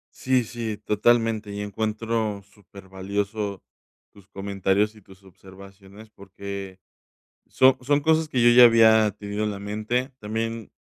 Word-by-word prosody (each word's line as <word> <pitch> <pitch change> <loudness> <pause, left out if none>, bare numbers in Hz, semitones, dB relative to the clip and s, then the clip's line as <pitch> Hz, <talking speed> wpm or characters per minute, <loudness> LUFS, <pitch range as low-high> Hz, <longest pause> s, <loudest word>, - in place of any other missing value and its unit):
Sí, 130 -1 +1
sí, 115 -2 -5
totalmente. 110 0 +1
Y 100 0 -5
encuentro, 110 0 -3
súper 100 -1 -17
valioso 100 +1 -4 0.5
tus 100 -2 -19
comentarios 100 +1 -1
y 110 - -18
tus 95 0 -19
observaciones, 95 +3 -16
porque 100 -1 -9 0.7
son 130 0 +4
son 145 +3 +1
cosas 160 +1 +2
que 130 -5 -1
yo, 120 - +6
ya 120 +1 +8
había 110 -2 +5
tenido 105 +1 -5
en 105 - -1
la 100 - -6
mente. 110 +6 -3
También 115 0 -5
105 Hz, 140 wpm, -24 LUFS, 100-115 Hz, 0.7 s, ya